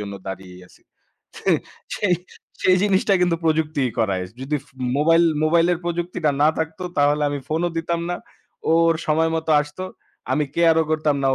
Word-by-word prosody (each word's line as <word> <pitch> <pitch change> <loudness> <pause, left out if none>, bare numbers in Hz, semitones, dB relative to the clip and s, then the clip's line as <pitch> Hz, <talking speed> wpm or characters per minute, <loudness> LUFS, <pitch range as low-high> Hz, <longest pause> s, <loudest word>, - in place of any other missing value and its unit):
জন্য 100 -1 -5
দাঁড়িয়েই 95 -1 -8
আছি। - - -23 0.6
সেই, - - +2 0.4
সেই, 190 -4 +2 0.5
সেই 185 - +5
জিনিসটা 200 0 +2
কিন্তু 175 -2 +2
প্রযুক্তিই 155 -4 +1
করায়। 100 -5 +1 0.2
যদি 140 +3 -1
ফ - - -24 0.3
মোবাইল 165 +3 +4 0.2
মোবাইলের 170 +2 +3
প্রযুক্তিটা 175 -2 -1
না 150 - +6
থাকতো 160 +3 -3 0.2
তাহলে 145 +1 +3
আমি 145 - -2
ফোনও 165 +3 0
দিতাম 170 +1 -2
না। 175 - -1 0.5
ও - - +5 0.2
ওর 165 - +2
সময় 160 +1 +2
মতো 160 0 -3
আসতো। 150 +5 -8 0.5
আমি 150 +3 +2
care 165 -1 +4
ও - - -3
করতাম 155 -2 +1
না - - +2
160 Hz, 170 wpm, -22 LUFS, 145-170 Hz, 0.6 s, না